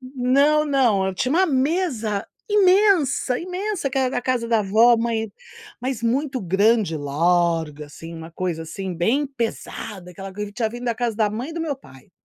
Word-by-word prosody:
Não, 275 +4 +2
não. 245 -9 +2
Eu 190 - -2
tinha 255 +8 -1
uma 375 +3 +4
mesa 260 - 0 0.2
imensa, 375 -10 +3
imensa 365 -4 -3
que 270 - -1
era 260 -1 0
a - - -5
casa 245 -3 -1
da 225 -2 +3
vó, 225 +4 +5
mãe 225 -2 -1 0.5
mas 250 -2 -3
muito 265 +3 0
grande 200 0 +2
e - - -2
larga, 160 0 0
assim, 165 +3 -10
uma 160 0 -9
coisa, 170 -1 -3
assim, 185 +3 -5
bem 245 - +1
pesada. 225 -6 -5
Aquela 195 +2 -9
coisa 210 +2 -4
que 205 - -21
tinha 225 -2 0
vindo 240 +1 -7
da 235 -1 0
casa 235 -2 -2
da 215 -2 +2
mãe 245 +9 -5
do 335 - -4
meu 300 -4 -2
pai. 135 - -17
230 Hz, 185 wpm, -22 LUFS, 190-275 Hz, 0.5 s, vó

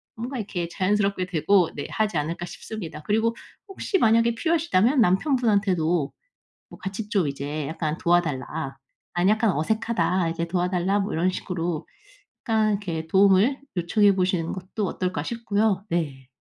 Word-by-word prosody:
뭔가 245 +4 -5
이렇게 190 -6 -3
자연스럽게 195 +1 0
되고 180 +1 +3
네, 145 - -5
하지 215 -6 0
않을까 165 +4 -2
싶습니다. 175 -5 -7
그리고 225 +6 +1 0.3
혹시 390 0 -1
만약에 230 -4 +3
필요하시다면 295 - +2
남편분한테도 190 - +2 0.6
뭐 - - -13
같이 200 +2 -5
좀 195 -8 +1
이제 140 +1 -4
약간 160 -1 -2
"도와달라. 155 -4 0 0.4
난 175 +2 +3
약간 220 -1 +3
어색하다". 185 +1 0
이제 165 0 -2
"도와달라." 180 +2 0
뭐 200 +1 -2
이런 170 +3 +2
식으로 175 -3 -3 0.6
약간 220 -2 +3
이렇게 170 -6 -3
도움을 200 +8 +4 0.2
요청해 200 +4 +4
보시는 180 -3 0
것도 190 +3 -4
어떨까 180 -6 -2
싶고요. 210 -2 0
네. 145 -6 -2
185 Hz, 350 characters per minute, -25 LUFS, 170-215 Hz, 0.6 s, 도움을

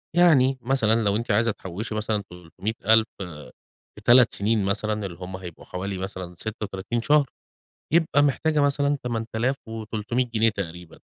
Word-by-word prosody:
يعني 135 -7 +5
مثلًا 115 -3 +2
لو 100 0 +2
أنتِ 115 0 -1
عايزة 115 +2 +3
تحوشي 105 +4 -6
مثلًا 110 -1 -1
300000 110 +6 +1 0.9
في 105 - -12
3 120 0 +6
سنين 105 0 +1
مثلًا، 105 +1 -1
اللي 85 -3 -7
هم 95 +1 -6
هيبقوا 90 -3 -10
حوالي 95 +1 -4
مثلًا 95 -2 -6
36 105 +2 -4
شهر، 145 +2 +4 0.7
يبقى 155 -4 +4
محتاجة 150 +2 +2
مثلًا 145 0 +2
8300 115 0 -2
جنيه 110 +1 +4
تقريبًا، 90 -5 -7
110 Hz, 135 wpm, -25 LUFS, 100-125 Hz, 0.9 s, 3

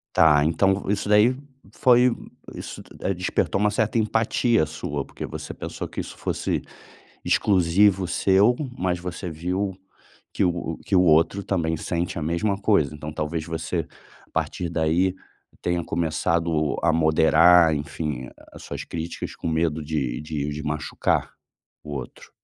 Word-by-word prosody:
Tá. 75 -2 +5
Então, 95 +5 +2
isso 100 0 -1
daí 105 +5 +5 0.4
foi 125 -1 +4 0.4
isso - - -7
tu - - -16 0.2
despertou 95 +1 -1
uma 105 - +3
certa 110 +2 0
empatia 115 -1 +2
sua, 75 -2 -4
porque - - -8
você - - -7
pensou - - -6
que - - -7
isso - - -6
fosse - - -2 0.6
exclusivo 95 0 +3
seu, 100 +6 +3 0.2
mas 90 -1 -1
você 90 +1 -5
viu 90 +4 -2 0.6
que - - -1
o 85 -2 -1
que 95 - -1
o 90 - +6
outro 85 +4 +3
também 80 -4 0
sente 85 +2 -3
a 80 - -3
mesma 90 +5 0
coisa. 100 -9 +2
Então 75 0 -7
talvez 80 +1 -3
você, 80 -1 -3 0.4
a - - -31
partir 90 - -2
daí, 85 +3 +1 0.5
tenha 85 -1 -1
começado 80 -2 0
a 85 - +3
moderar, 80 +1 +5
enfim, 75 -3 -4 0.2
as - - -12
suas - - -5
críticas 85 0 -6
com - - -6
medo 80 -1 0
de 75 -5 -2
de 75 -1 -3
de 75 +1 -5
machucar 75 +1 -1 0.5
o 75 - -7
outro? 65 -4 -7
85 Hz, 145 wpm, -24 LUFS, 80-95 Hz, 0.6 s, o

